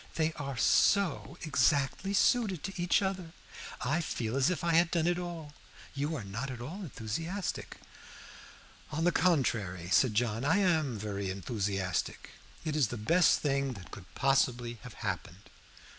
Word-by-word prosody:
"They 160 0 +1
are 140 -4 -5
so 185 - +3
exactly 145 +6 +1
suited 205 -6 +2
to 195 - -4
each 175 +3 +2
other. 185 -4 -3 0.5
I 150 +7 +1
feel 120 -6 -3
as 135 +3 +3
if 180 -4 -2
I 170 -1 +2
had 170 +1 +5
done 170 -2 +1
it 175 0 +1
all. 170 -4 -6 0.4
You 145 +3 -2
are 130 - -4
not 110 +8 -4
at 125 -2 -6
all 160 +12 -6
enthusiastic." 165 - -4 1.1
"On 155 +2 -1
the 175 - +4
contrary," 110 - +1
said 120 -2 +4
John, 115 +1 0
"I 165 +7 +3
am 160 - +2
very 100 -2 -3
enthusiastic. 95 -2 -2 0.3
It 155 -1 -1
is 145 -6 +3
the 120 - -5
best 165 +10 +4
thing 140 -2 0
that 100 -5 -11
could 90 -3 -11
possibly 125 -4 +1
have - - -10
happened." 95 +4 -5
140 Hz, 160 wpm, -31 LUFS, 115-170 Hz, 1.1 s, had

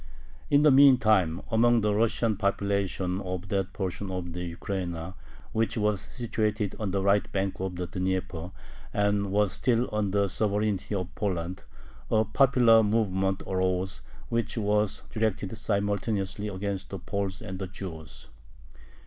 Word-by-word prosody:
In 145 +1 +5
the 150 - +7
meantime, 110 - +5
among 120 +1 +4
the 105 0 +1
Russian 115 +1 +2
population 100 -2 -1
of 90 0 -5
that 95 -1 -1
portion 95 0 -4
of 90 -2 -4
the 90 +1 -4
Ukraina 90 -3 -4 0.4
which 115 +1 0
was 105 -2 +1
situated 110 -4 -1
on 105 -3 -2
the 95 +1 -1
right 100 +1 +2
bank 95 0 -1
of 95 -1 -3
the 90 0 -3
Dnieper, 90 -1 -2 0.4
and 105 -1 +1
was 105 -1 +2
still 120 -1 +1
under 100 -1 +1
the 100 - +2
sovereignty 105 -1 -1
of 90 -2 -4
Poland, 95 -2 -3 0.4
a 110 0 +3
popular 120 -1 +5
movement 95 -3 +1
arose, 95 0 -1 0.3
which 115 +1 -1
was 105 -1 +1
directed 110 -2 -1
simultaneously 100 -1 -1
against 95 -1 -4
the 95 - -5
Poles 95 +1 -3
and 95 0 -7
the 95 - -3
Jews. 80 -8 -9
100 Hz, 140 wpm, -28 LUFS, 95-110 Hz, 0.4 s, the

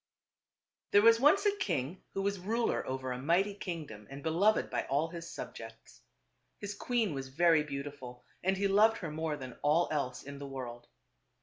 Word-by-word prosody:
There 205 - +5
was 230 0 +7
once 305 - +5
a 410 0 +3
king 165 - -2
who 195 - -1
was 200 -1 -1
ruler 225 +6 0
over 130 0 -3
a 125 0 -4
mighty 180 +8 +2
kingdom 160 - -7
and 140 +1 -9
beloved 185 +7 +2
by - - -1
all 145 +4 0
his 170 0 -8
subjects. - - -9 0.6
His 205 0 -5
queen 225 -3 0
was 135 -1 -4
very 165 +3 +4
beautiful 140 -4 -7 0.2
and 190 +1 +2
he 200 +1 +2
loved 215 +3 +5
her 165 -4 -5
more 155 -1 -2
than 130 -3 -9
all 155 +4 +3
else 135 -5 -2
in 140 0 -8
the 140 - -6
world. 120 -3 -7
160 Hz, 180 wpm, -32 LUFS, 135-200 Hz, 0.6 s, was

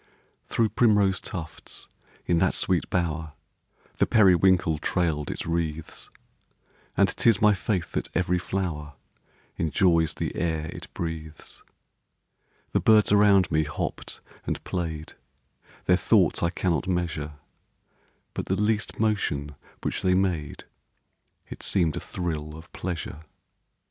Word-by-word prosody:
Through 115 -2 +1
primrose 105 -3 +3
tufts, 85 -5 -7 0.4
in 85 -1 +2
that 90 +1 +2
sweet 90 -3 +1
bower, 80 -3 -1 0.6
The - - +3
periwinkle 95 -5 +4
trail'd 80 -4 0
its - - -4
wreaths; 80 -2 -3 0.9
And - - +5
'tis 115 -4 +4
my 105 -1 +5
faith 95 -2 -2
that - - -2
every 90 0 +1
flower 85 -6 -3 0.6
Enjoys 85 -1 +2
the - - -3
air 80 -1 -1
it - - -10
breathes. 80 -2 -6 1.1
The - - +2
birds 110 -2 +5
around 100 -2 +5
me 80 0 +3
hopp'd 75 -1 -5 0.3
and - - -2
play'd, 80 -4 -4 0.7
Their 90 - +4
thoughts 95 -5 +3
I 85 - +2
cannot 90 0 -1
measure 85 -5 -2 1.0
But - - -4
the 95 - +1
least 105 +1 0
motion 95 -10 0 0.3
which - - -2
they 90 -1 +3
made 90 -7 -1 0.8
It - - -9
seem'd 85 -5 +2
a - - -2
thrill 80 -4 -4
of 80 +2 -14
pleasure. 85 -4 -4
85 Hz, 125 wpm, -26 LUFS, 80-95 Hz, 1.1 s, And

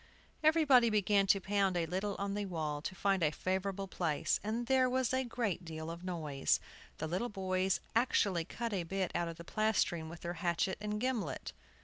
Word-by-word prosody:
Everybody 295 -7 +6
began 205 -2 +3
to 195 - +5
pound 195 -1 +1
a 170 - +1
little 190 +4 -2
on 200 0 -2
the 205 0 -2
wall 155 -4 -2
to 185 - -5
find 195 -1 +1
a 155 - +4
favorable 190 +4 -2
place, 165 -5 0
and 225 +3 -2
there 260 0 +3
was 255 0 +1
a 260 0 +2
great 230 -7 -2
deal 160 -1 -6
of 170 +1 -8
noise. 155 -6 0 0.4
The - - -3
little 185 +9 -1
boys 190 -1 0 0.2
actually 200 -7 +2
cut 230 +3 -4
a 190 - 0
bit 185 +2 -2
out 175 0 0
of 165 -1 -6
the 170 - -8
plastering 175 -6 0
with 170 +1 -10
their 175 0 -3
hatchet 175 +1 0
and 210 0 -2
gimlet. 225 - -2
190 Hz, 195 wpm, -34 LUFS, 170-215 Hz, 0.4 s, Everybody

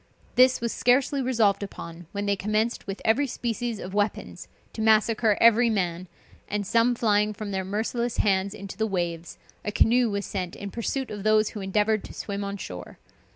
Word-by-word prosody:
This 255 0 +5
was 235 -1 -1
scarcely 265 +3 +2
resolved 230 -6 +2
upon, 170 -4 -8
when 205 -1 -3
they 200 0 +2
commenced 215 +4 -1
with 195 0 -6
every 250 +6 +3
species 235 -1 -3
of 190 -1 -7
weapons 205 +1 -2 0.3
to 220 - -5
massacre 220 0 +3
every 230 +1 +6
man, 180 -4 -1 0.4
and 205 0 -2
some 230 +4 +3
flying 210 -2 +2
from 205 0 -5
their 190 -1 -2
merciless 225 +5 -2
hands 195 0 +1
into 200 -2 -8
the 220 0 0
waves, 170 -4 -3 0.3
a 210 - -2
canoe 240 +3 +3
was 200 -1 -2
sent 180 -3 -4
in 200 -1 -7
pursuit 255 +4 -3
of 205 -1 -5
those 215 +1 +3
who 210 - -7
endeavored 210 +2 +1
to - - -11
swim 200 -1 -4
on 200 0 -4
shore. 90 - -8
210 Hz, 185 wpm, -26 LUFS, 195-230 Hz, 0.4 s, every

